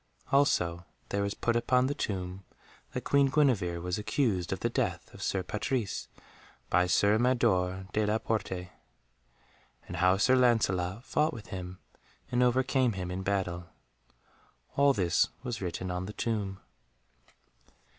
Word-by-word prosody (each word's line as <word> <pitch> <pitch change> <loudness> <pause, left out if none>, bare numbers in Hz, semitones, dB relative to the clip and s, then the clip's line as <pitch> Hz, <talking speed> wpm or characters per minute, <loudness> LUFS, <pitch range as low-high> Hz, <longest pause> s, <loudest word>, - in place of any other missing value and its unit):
Also 90 -12 +2 0.3
there 100 - 0
was 100 0 -1
put 120 - 0
upon 125 +2 +3
the 140 - 0
tomb 95 -7 -4 0.5
that - - -4
Queen 140 -1 +4
Guenevere 125 - +2
was 90 +3 -2
accused 105 -5 0
of - - -3
the - - +2
death - - -2
of - - -11
Sir 95 -2 -1
Patrise 105 +2 -2 0.6
by 90 0 +4
Sir 100 +4 +3
Mador 95 -7 +2
de 105 -1 +1
la 105 +1 +2
Porte, 95 -5 -3 1.2
and - - -6
how 90 +1 +4
Sir 130 +6 +4
Lancelot 110 -5 +2
fought 150 +4 +1
with 110 -4 -9
him 90 -2 -6 0.5
and 125 - +2
overcame 125 0 +2
him 90 -2 -4
in 95 +1 -3
battle. 90 -3 -2 1.1
All 140 0 +5
this 90 -6 +2
was 120 -5 -4
written 90 0 -3
on 90 +1 -3
the 105 - -6
tomb. 105 -5 -2
100 Hz, 145 wpm, -30 LUFS, 90-125 Hz, 1.2 s, All